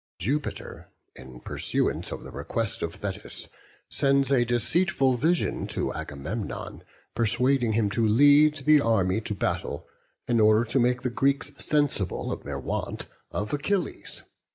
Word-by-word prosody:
Jupiter, 140 +9 -3 0.3
in 65 -1 -12
pursuance - - -1
of - - -6
the - - -9
request 115 -3 -3
of 85 0 -3
Thetis, 100 -2 -5 0.4
sends 140 0 +2
a 130 -3 +4
deceitful 135 - +2
vision 165 +7 0
to - - -2
Agamemnon, 80 +10 -5 0.3
persuading 120 +1 +2
him 110 -1 +2
to 115 +1 +1
lead 145 +6 +6
the 150 -1 +6
army 105 -3 +2
to 105 -2 -3
battle 70 - -2 0.4
in 120 -1 +2
order 110 +2 +5
to 135 - +3
make 125 0 +1
the 125 - -1
Greeks 140 +3 +1
sensible 145 - 0
of - - -4
their - - -4
want - - -4 0.2
of 105 +5 -4
Achilles. 175 +6 -2
120 Hz, 140 wpm, -26 LUFS, 105-140 Hz, 0.4 s, lead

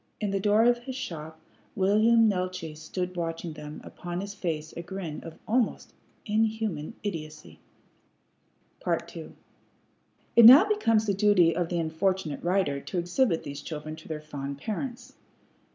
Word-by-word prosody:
In 210 -2 -1
the 195 - 0
door 210 +2 +4
of 240 0 +4
his 255 +1 -7
shop 160 - -6 0.4
William 220 +3 +4
Neeltje 185 -5 -2
stood 180 +4 -5
watching 165 -1 -4
them, 150 0 -8
upon 175 0 -6
his 200 +1 -5
face 160 -6 -4
a - - -4
grin 180 -3 -6
of 165 - -10
almost 235 0 0 0.3
inhuman 220 -5 -1
idiocy. 155 -6 -6 1.3
II - - -3 1.0
It 235 - +9
now 275 - +10
becomes 230 - +2
the 200 - +1
duty 195 -4 +4
of 170 -1 -1
the 175 - -1
unfortunate 165 0 -1
writer 175 -6 +1
to 180 - -6
exhibit 175 +2 +1
these 145 0 -7
children 155 0 -6
to 160 - -13
their 155 -1 -5
fond 140 -2 -6
parents. 235 - -5
180 Hz, 145 wpm, -27 LUFS, 160-215 Hz, 1.3 s, now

